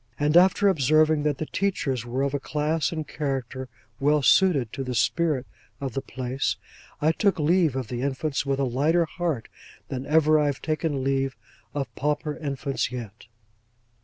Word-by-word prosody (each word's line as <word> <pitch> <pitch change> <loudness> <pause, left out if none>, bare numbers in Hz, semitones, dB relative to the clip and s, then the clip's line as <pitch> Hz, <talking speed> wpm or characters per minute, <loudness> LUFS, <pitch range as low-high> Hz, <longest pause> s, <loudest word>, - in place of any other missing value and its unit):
And 150 +2 +2
after 190 +3 +6
observing 155 -2 +3
that 145 -2 0
the 155 - -3
teachers 140 - -1
were 130 +3 -1
of 140 0 -1
a 145 - 0
class 150 +2 -1
and 155 -3 -4
character 135 -3 -4 0.3
well 145 +1 +3
suited 145 - +4
to 135 - -3
the 125 -1 -4
spirit 150 +1 +1 0.3
of 135 -3 -4
the 135 - -2
place, 130 +1 -2 0.4
I 155 +2 +3
took 200 +2 +1
leave 160 -2 +2
of 130 -3 -3
the 120 -1 -3
infants 140 +2 -1
with 135 -1 -1
a - - +2
lighter 150 +7 +2
heart 160 - -3 0.4
than 130 0 -4
ever 155 0 +4
I 150 - +2
have 140 -2 -2
taken 155 -3 -1
leave 135 0 0 0.4
of 140 -2 -3
pauper 150 +1 -1
infants 140 -4 -2
yet. 115 -4 -8
145 Hz, 170 wpm, -25 LUFS, 130-155 Hz, 0.4 s, after